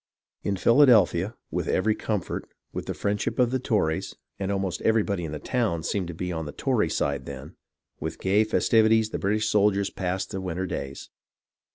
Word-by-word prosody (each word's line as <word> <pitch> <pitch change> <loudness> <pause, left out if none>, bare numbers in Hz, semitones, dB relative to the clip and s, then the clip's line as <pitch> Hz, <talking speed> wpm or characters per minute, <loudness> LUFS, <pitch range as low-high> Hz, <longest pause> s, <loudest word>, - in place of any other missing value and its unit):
In 100 - -1
Philadelphia, 110 -5 +5 0.2
with - - -2
every 110 +4 +2
comfort, 105 -3 -3 0.2
with - - -5
the - - -3
friendship 100 0 -1
of 125 -1 +3
the 130 - 0
Tories 100 -10 0 0.2
(and 100 0 -1
almost 95 -3 -2
everybody 105 -5 +1
in 75 - -5
the 75 - -4
town 105 - -1
seemed 100 -2 -1
to 85 - -6
be 90 +2 -3
on 80 -2 -3
the - - -5
Tory - - 0
side 70 -2 -1
then), 65 -1 -8 0.4
with - - -4
gay 100 +3 +3
fes 110 - 0
tivities, 110 -1 +4
the - - -3
British 105 +2 +1
soldiers 100 -2 +2
passed 95 0 -3
the 95 -2 -3
winter 95 0 -3
days. 70 -6 -6
100 Hz, 185 wpm, -26 LUFS, 85-110 Hz, 0.4 s, Philadelphia